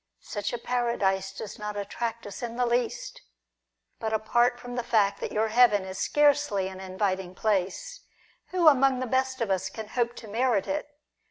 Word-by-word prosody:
Such 205 -1 -3
a 240 - -2
Para 240 0 -1
dise 190 -1 +1
does 210 +1 -8
not 210 0 -4
attract 230 +3 -4
us 205 - -8
in 235 -1 -4
the 250 0 +1
least. 240 0 -1 0.8
But, 220 0 -2
apart 240 +3 +2
from 245 0 -7
the 245 - 0
fact 215 -4 +2
that - - -4
your 220 +1 +1
heaven 215 -4 +5
is 190 0 -6
scarcely 290 -10 +3
an 190 0 -9
inviting 185 -1 -2
place, 215 - -1 0.5
who 360 -3 +2
among 270 -3 +5
the 255 - -1
best 260 +1 0
of 220 -4 0
us 190 0 0
can 215 +1 -8
hope 240 -1 0
to 225 - -10
merit 225 -1 +1
it 295 +1 -2
225 Hz, 185 wpm, -27 LUFS, 200-250 Hz, 0.8 s, heaven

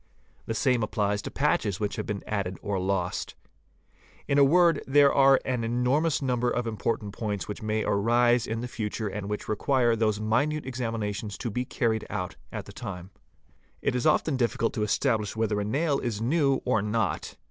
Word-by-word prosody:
The 115 - -2
same 125 -1 +2
applies 105 -1 0
to - - -6
patches 110 -9 0
which 105 -1 -2
have 110 - -4
been 105 -3 -3
added 95 -3 -2
or 100 -2 -1
lost. 90 -1 -2 0.9
In 140 - +3
a - - +8
word 170 +4 +4
there 140 +1 +5
are 135 -1 +6
an 125 -3 -1
enormous 130 +7 +1
number 125 -2 +1
of 120 0 -1
important 110 -2 -2
points 105 -3 -3
which 105 - -6
may 110 0 -1
arise 120 +3 +3
in 115 +1 -3
the 125 - -3
future 110 -2 -3
and 100 0 -5
which 105 - -4
require 120 +2 +2
those 110 -2 +1
minute 130 +8 0
examina 115 -5 -2
tions 105 0 -6
to 115 - -4
be 125 +4 -2
carried 110 -3 -1
out 90 -1 -4 0.2
at - - -5
the - - -11
time. 95 -4 -7 0.7
It - - +1
is 125 +3 +1
often 155 -2 +2
difficult 115 -2 0
to 110 - -2
establish 110 -1 0
whether 110 -2 0
a - - -1
nail 140 +7 0
is 115 -4 -3
new 135 +2 +1
or 115 -5 +2
not. 105 -2 -1
115 Hz, 190 wpm, -27 LUFS, 105-130 Hz, 0.9 s, a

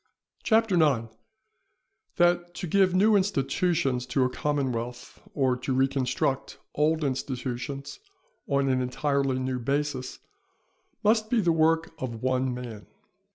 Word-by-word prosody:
CHAPTER 225 -2 +2
IX.—_That 175 - -2
to - - -4
give 185 +1 +3
new 210 +3 +5
Institutions 140 -7 0
to 130 +1 +1
a 125 - 0
Commonwealth, 125 -4 -3
or 130 -3 +2
to 130 +1 -3
reconstruct 135 0 0 0.2
old 155 +2 +1
Institutions 130 - -4 0.5
on 140 -1 +1
an 130 -1 +2
entirely 135 +1 0
new 130 0 -2
basis, 140 0 -2 0.9
must 215 +1 +3
be 240 - +2
the 175 -5 +3
work 160 0 +2
of 120 -3 -5
one 130 0 +1
Man_. 120 -4 -7
140 Hz, 115 wpm, -27 LUFS, 130-175 Hz, 0.9 s, new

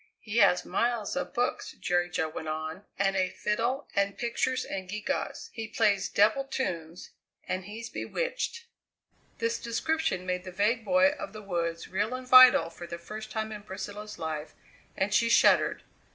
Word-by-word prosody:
"He 220 +1 -5
has 195 -5 +5
miles 235 -1 0
of 275 - -3
books," 245 0 -1
Jerry 175 0 0
Jo 160 -2 -1
went 155 0 -6
on, 155 +5 -4
"and 195 0 +1
a 185 -1 +2
fiddle 225 +7 -1
and 200 0 +1
pictures 245 +2 -1
and 190 -1 -5
gewgaws. 215 +8 -3
He 225 -1 -5
plays 200 -2 +2
devil 215 +7 +3
tunes, 180 -11 -4 0.4
and 185 0 -2
he's 220 +3 -7
bewitched!" - - -3 0.7
This 460 0 -1
description 235 - -1
made 180 0 -2
the 185 - -7
vague 210 +5 +1
boy 275 +4 +5
of 305 - -6
the 215 -1 -9
woods 170 -3 -2
real 205 +6 -1
and 255 0 -7
vital 255 -10 +8
for 175 +1 -9
the 170 - -6
first 215 +6 -8
time 220 0 -3
in 210 -1 -6
Priscilla's 205 +1 -7
life, 155 -1 -5 0.4
and 195 +2 0
she 230 +2 +3
shuddered. - - +4
210 Hz, 165 wpm, -29 LUFS, 185-235 Hz, 0.7 s, vital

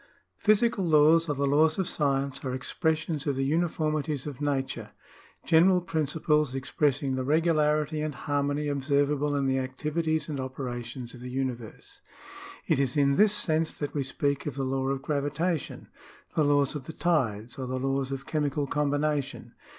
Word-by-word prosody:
Physical 215 0 +3
laws 160 0 +5
or 145 - 0
the 140 +1 0
laws 155 +3 +3
of 190 -2 0
science 140 -5 -1
are 130 -2 -2
expressions 155 +2 -1
of 140 - +1
the 135 +1 0
uniformities 155 -2 -1
of 145 -2 -7
nature 135 -6 -2 0.3
— - - -27
general 180 +3 +5
principles 150 -4 0
expressing 140 0 0
the 130 0 -1
regularity 155 0 +2
and 155 -2 -3
harmony 145 +2 -1
observable 145 +1 +1
in 140 -1 0
the 130 0 +1
activities 155 +5 -2
and 145 -3 -4
operations 125 -2 -5
of 125 - -11
the 125 - -6
universe. 125 -3 -5 0.6
It - - +2
is 135 0 0
in 140 -1 +3
this 210 +4 +5
sense 160 -4 +1
that 145 -1 -5
we 145 - -1
speak 140 +1 -1
of 145 - -3
the 135 -1 -2
law 135 0 -1
of 135 0 -2
gravitation, 150 +3 -2 0.5
the 155 - +3
laws 145 -1 +2
of 145 -4 -6
the 160 - -7
tides, 120 -10 -1
or 130 - -3
the 130 +1 -2
laws 135 +1 -1
of 135 0 -5
chemical 145 -2 -1
combination. 145 0 -1
145 Hz, 165 wpm, -28 LUFS, 135-155 Hz, 0.6 s, laws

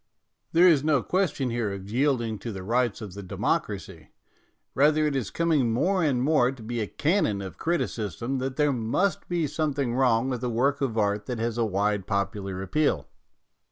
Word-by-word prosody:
There 175 +2 +6
is 155 -6 +5
no 150 -4 +2
question 155 -9 0
here 115 -3 -1
of 100 -1 -7
yielding 120 -2 0
to 115 - -5
the 95 -2 -6
rights 120 +2 0
of 105 -4 -7
the 100 - -7
democracy; 95 - -3 0.6
rather 150 +2 +3
it 150 -2 0
is 125 -7 -1
coming 155 -8 +1
more 180 +10 +1
and 130 -5 +1
more 135 -4 +3
to 130 -4 -11
be 120 +2 -3
a 105 - -2
canon 150 - +1
of 95 -2 -8
criticism 130 -6 -2
that 130 0 -3
there 150 0 +2
must 125 - -1
be 175 -2 0
something 145 -4 -1
wrong 125 -2 +2
with 125 -2 -3
a 125 - 0
work 135 +5 +1
of 120 -5 -1
art 105 -1 0
that 125 - -3
has 115 +1 -2
a 115 - +2
wide 100 -1 0
popular 100 -2 -2
appeal. 140 - 0
125 Hz, 190 wpm, -26 LUFS, 110-145 Hz, 0.6 s, There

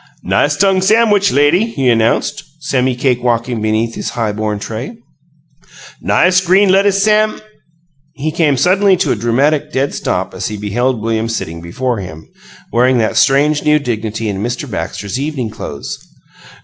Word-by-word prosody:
"Nice - - +1
tongue 195 -1 +3
samwich, 205 0 +3
lady!" 145 +7 +3
he 135 - -2
announced, 115 -2 +1 0.2
semi 130 -3 0
cake 125 -1 0
walking 120 -1 -1
beneath 110 +2 0
his - - -4
high 115 -3 -2
borne 105 0 -3
tray. 115 - -6 1.0
"Nice 185 0 +3
green 190 +2 +3
lettuce 195 +1 +3
sam 215 0 +2 0.4
" 155 -3 -42
He 155 - 0
came 155 -4 +1
suddenly 190 +6 +3
to 170 -6 0
a - - +1
dramatic 140 +6 0
dead 135 +2 -1
stop - - -2
as - - -4
he 105 - -5
beheld 110 +3 -1
William 115 0 -1
sitting 85 -7 -4
before 120 +8 -3
him, 80 -4 -9 0.5
wearing 125 +2 +3
that 110 -1 0
strange 145 +5 +3
new 150 0 +4
dignity 110 -5 -3
and 100 -1 -3
Mr. 120 +1 -3
Baxter's 100 +5 -4
evening 135 -6 -3
clothes. 90 -10 -7
130 Hz, 160 wpm, -15 LUFS, 110-170 Hz, 1.0 s, new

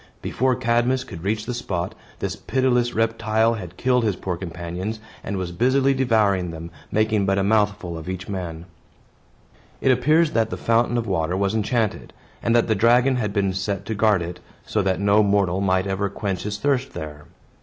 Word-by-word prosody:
Before 130 0 +1
Cadmus 120 +3 +1
could 85 -9 -9
reach 105 +2 -1
the 125 - -3
spot, 90 -6 -3 0.2
this - - -3
pitiless 125 -2 +1
reptile 115 0 +2
had 90 -5 -7
killed 125 -1 +2
his 105 -4 +1
poor 90 -1 -3
companions, 90 +4 -5 0.2
and 100 - -3
was 90 -2 -3
busily 130 +8 +3
devouring 110 -8 +2
them, 85 0 -7 0.2
making 110 -2 +2
but 95 0 +2
a 100 - +2
mouthful 100 -5 +1
of 80 +3 -8
each 95 0 -5
man. 85 -4 -5 1.1
It 135 - +3
appears 155 +6 +3
that 115 -4 +1
the - - -4
fountain 115 +1 +2
of 115 - -1
water 90 -3 0
was 100 +1 +1
enchanted, 110 0 -1 0.3
and 115 0 +2
that 120 - +3
the 110 - +3
dragon 120 +5 +4
had 105 -4 -1
been 100 -2 0
set 95 +1 -3
to 110 - -3
guard 105 -4 +3
it, 85 +1 -6 0.3
so 105 - 0
that 95 -1 0
no 100 +1 +4
mortal 100 -2 +2
might 95 -1 +2
ever 100 +1 -1
quench 100 -2 -3
his 105 0 -3
thirst 135 +1 0
there. 75 -1 -7
105 Hz, 185 wpm, -23 LUFS, 95-115 Hz, 1.1 s, dragon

